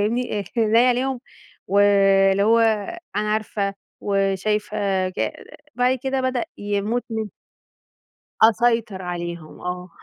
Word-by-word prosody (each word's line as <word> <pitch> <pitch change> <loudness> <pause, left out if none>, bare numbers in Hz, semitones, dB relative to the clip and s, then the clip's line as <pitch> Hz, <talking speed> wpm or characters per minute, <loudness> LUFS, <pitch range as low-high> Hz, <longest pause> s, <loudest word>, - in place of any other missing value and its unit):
فاهمني، 215 -1 -1
عينيَّ 230 +2 +4
عليهم، 255 0 0 0.5
واللي 195 0 +4
هو 225 +2 +4 0.6
أنا 210 0 0
عارفة 205 -2 -2 0.3
وشايفة 195 -1 0
ج 185 - -2 0.4
بعد 250 +1 +2
كده 265 0 -1
بدأ 255 -2 -1
يموت 205 +4 -1
من 220 -1 -3 1.1
أسيطر 225 -3 +3
عليهم 170 -2 -6
آه، 180 0 -5
210 Hz, 100 wpm, -22 LUFS, 195-230 Hz, 1.1 s, عينيَّ